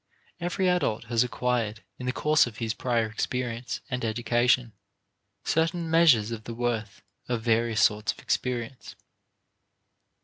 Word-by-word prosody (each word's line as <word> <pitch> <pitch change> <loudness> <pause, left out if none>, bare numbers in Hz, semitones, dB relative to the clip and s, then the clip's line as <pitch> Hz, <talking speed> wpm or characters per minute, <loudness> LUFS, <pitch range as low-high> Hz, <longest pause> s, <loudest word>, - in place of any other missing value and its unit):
Every 180 +2 0
adult 175 -12 +1
has 115 +1 +4
acquired, 120 -3 -1 0.2
in 125 - -5
the - - +2
course 150 +1 +3
of 110 -3 -9
his 115 -1 -2
prior 120 -2 0
experience 120 +2 -3
and 125 -3 -3
education, 120 +1 +1 0.7
certain 165 +1 0
measures 145 -10 +5
of 110 -1 -6
the 115 - -6
worth 115 -4 -3 0.3
of 120 -2 -1
various 115 -1 +2
sorts 105 -1 +2
of - - -14
experience. 125 0 -3
120 Hz, 135 wpm, -27 LUFS, 115-125 Hz, 0.7 s, measures